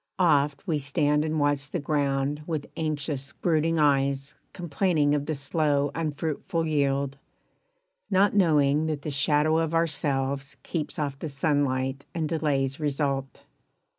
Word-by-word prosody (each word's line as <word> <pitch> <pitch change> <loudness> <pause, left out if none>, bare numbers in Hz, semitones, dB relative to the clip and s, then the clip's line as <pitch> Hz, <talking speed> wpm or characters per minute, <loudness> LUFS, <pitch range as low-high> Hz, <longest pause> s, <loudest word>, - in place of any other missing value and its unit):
Oft 145 -5 +2
we 160 -6 0
stand 145 +1 +1
And 155 0 -1
watch 145 -1 +1
the 175 - -2
ground 145 -1 0
with 155 -4 -2
anxious 145 -3 -3
brooding 165 0 +1
eyes 140 -1 +2 0.2
Complaining 165 -3 +1
of 145 -1 -1
the 155 - -1
slow 145 0 +1
unfruitful 160 +1 -2
yield, 140 -2 0 0.9
Not 195 +1 +3
knowing 155 -5 +3
that 150 -2 -3
the 150 - -3
shadow 150 +3 +2
of 165 0 -1
ourselves 140 -3 -1
Keeps 155 -4 -4
off 140 -2 -3
the 160 - -4
sunlight 140 -2 0
and 160 -2 -1
delays 145 -3 0
result. 140 -2 -2
145 Hz, 135 wpm, -26 LUFS, 140-155 Hz, 0.9 s, Not